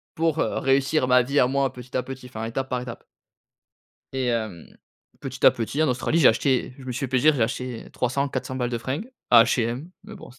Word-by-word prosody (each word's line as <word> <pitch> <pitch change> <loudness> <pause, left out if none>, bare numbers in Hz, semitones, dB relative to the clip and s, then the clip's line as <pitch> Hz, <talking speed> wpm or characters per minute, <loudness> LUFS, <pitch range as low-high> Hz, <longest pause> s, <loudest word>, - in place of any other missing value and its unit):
Pour 160 -1 0
réussir 135 -1 +1
ma 125 0 +5
vie 140 +4 0
à - - +5
moi, 135 0 0
petit 125 -1 -11
à 130 - +2
petit, 130 0 -9
enfin 110 -3 -7
étape 130 +4 -3
par 125 -1 -1
étape 125 -2 -8 1.1
et 130 -1 -1
hem, 110 -8 -3 0.5
petit 135 -1 -6
à - - +10
petit 120 +6 -2
en 155 - +2
Australie 125 +6 0
j'ai 145 - +7
acheté, 125 +2 +1
je 130 - -11
me 125 - -4
suis 125 - -4
fait 135 - -2
plaisir, 135 +4 +4
j'ai 120 - +1
acheté 125 +1 -3
300, 140 +3 -1
400 130 0 -4
balles 125 -1 -1
de 120 - -2
fringues, 140 - -4 0.2
à 115 -2 +9
H&M. 120 +6 -1
Mais 215 - -10
bon 195 - -12
c 130 - -19
130 Hz, 225 wpm, -24 LUFS, 120-140 Hz, 1.1 s, à